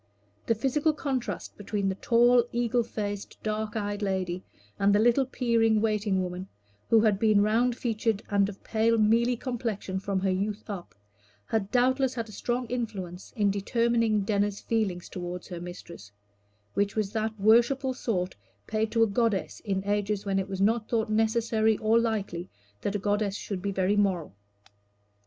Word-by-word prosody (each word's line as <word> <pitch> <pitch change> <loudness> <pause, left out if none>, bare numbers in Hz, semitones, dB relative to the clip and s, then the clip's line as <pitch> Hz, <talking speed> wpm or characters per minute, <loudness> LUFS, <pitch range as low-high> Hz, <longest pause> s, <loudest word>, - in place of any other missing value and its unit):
The 230 - +3
physical 285 +7 +1
contrast 270 -5 -3
between 205 -1 -2
the 190 - +1
tall, 240 +4 +4
eagle 240 0 +1
faced, 205 -3 -5
dark 215 +1 -2
eyed 205 -1 -2
lady, 185 -3 -1 0.4
and 200 +1 +4
the - - +4
little 240 +4 +3
peering 230 -4 +2
waiting 210 -3 +1
woman, 180 +1 -5 0.4
who 225 -1 +6
had 210 -3 +3
been 215 -2 +4
round 235 +3 +2
featured 225 -3 -1
and 200 -1 +3
of 200 - -11
pale 230 +1 +2
mealy 230 +3 +3
complexion 225 -6 -3
from 195 0 -1
her 190 0 +1
youth 205 +3 -2
up, 185 -4 -7 0.5
had 215 -3 -1
doubtless 260 +1 +2
had 230 -2 -3
a - - -11
strong 245 +4 -2
influence 205 -7 -5
in 205 -3 +2
determining 230 +1 +1
Denner's 205 0 0
feeling 210 -6 -1
toward 175 0 -6
her 175 -2 -7
mistress, 170 - -9 0.6
which 200 0 0
was 215 -3 0
of - - -20
that 220 -1 -2
worshipful 240 +6 +4
sort 185 -8 -2 0.3
paid 220 0 -1
to 230 -1 +4
a - - +4
goddess 210 -1 0
in 195 -3 -2
ages 205 0 -1
when 195 -1 +1
it 190 - -3
was 190 -1 -4
not 220 +2 +2
thought 220 -2 0
necessary 220 0 +2
or 220 +2 +3
likely 200 -6 -2 0.3
that 200 - -2
a - - +3
goddess 205 0 0
should 195 -2 -5
be 200 +1 -2
very 190 +1 +1
moral. 190 - +1
215 Hz, 170 wpm, -28 LUFS, 195-230 Hz, 0.6 s, who